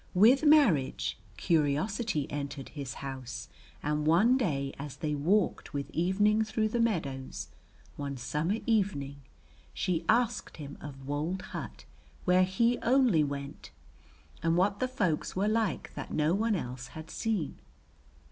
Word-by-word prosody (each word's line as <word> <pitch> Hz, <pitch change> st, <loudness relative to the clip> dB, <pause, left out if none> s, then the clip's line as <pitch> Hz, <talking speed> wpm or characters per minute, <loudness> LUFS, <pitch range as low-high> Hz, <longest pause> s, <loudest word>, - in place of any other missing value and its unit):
With 235 Hz, +10 st, +6 dB
marriage 145 Hz, -, +4 dB, 0.2 s
curiosity 160 Hz, -, +1 dB
entered 140 Hz, -1 st, -5 dB
his 140 Hz, -4 st, -6 dB
house, 130 Hz, -2 st, -6 dB, 0.3 s
and 150 Hz, +1 st, 0 dB
one 200 Hz, +11 st, +5 dB
day 140 Hz, -, -1 dB
as 145 Hz, -1 st, -6 dB
they 150 Hz, -1 st, -2 dB
walked 175 Hz, +4 st, +1 dB
with 140 Hz, 0 st, -3 dB
evening 205 Hz, +6 st, +2 dB
through 215 Hz, 0 st, 0 dB
the 240 Hz, -, -1 dB
meadows, 135 Hz, -, -1 dB, 0.5 s
one 140 Hz, -1 st, -4 dB
summer 150 Hz, -, -1 dB
evening, 165 Hz, -11 st, 0 dB, 0.5 s
she 175 Hz, -3 st, 0 dB
asked 235 Hz, 0 st, +1 dB
him 145 Hz, -2 st, -7 dB
of 135 Hz, -2 st, -9 dB
wold 155 Hz, +6 st, -2 dB
hut -, -, -6 dB, 0.4 s
where 185 Hz, 0 st, +5 dB
he 230 Hz, +6 st, +2 dB
only 245 Hz, -, +4 dB
went, 140 Hz, -1 st, -5 dB, 0.7 s
and 165 Hz, +1 st, +2 dB
what 195 Hz, +2 st, +2 dB
the 255 Hz, -, +1 dB
folks 205 Hz, -12 st, -1 dB
were 195 Hz, +3 st, +1 dB
like 215 Hz, -4 st, 0 dB
that -, -, -7 dB
no 155 Hz, +2 st, +2 dB
one 215 Hz, +2 st, +1 dB
else 125 Hz, -6 st, -5 dB
had 160 Hz, 0 st, -8 dB
seen. 210 Hz, -, -2 dB
165 Hz, 140 wpm, -30 LUFS, 140-215 Hz, 0.7 s, With